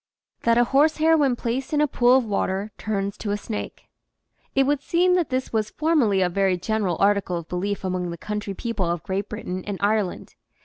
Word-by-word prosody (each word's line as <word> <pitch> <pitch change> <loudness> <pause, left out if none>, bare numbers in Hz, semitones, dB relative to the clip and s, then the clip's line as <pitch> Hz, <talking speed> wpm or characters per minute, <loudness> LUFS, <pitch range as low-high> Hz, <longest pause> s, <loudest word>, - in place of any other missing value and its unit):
THAT 230 0 +3
A 240 - +6
HORSEHAIR 310 +5 +3
WHEN 280 -5 +2
PLACED 255 +4 -3
IN 295 - +3
A 300 - +3
POOL 250 -1 +4
OF 260 - 0
WATER 200 0 -1
TURNS 200 -2 -2
TO 210 - -4
A 205 - 0
SNAKE 210 +1 -6 0.7
T 270 - +5
would 285 +1 +1
seem 355 +4 +2
that 355 -3 +1
this 255 -2 -2
was 215 -1 0
formerly 275 - +2
a - - +2
very 190 0 +1
general 190 -2 -1
article 200 -3 +2
of 170 -1 -7
belief 195 +3 -3
among 180 -1 -2
the 170 - -6
country 210 +1 -4
people 220 -6 -2
of 170 -2 -2
Great 195 +2 -3
Britain 185 -3 -5
and 200 -2 -3
Ireland. 205 -2 -1
210 Hz, 205 wpm, -24 LUFS, 190-260 Hz, 0.7 s, A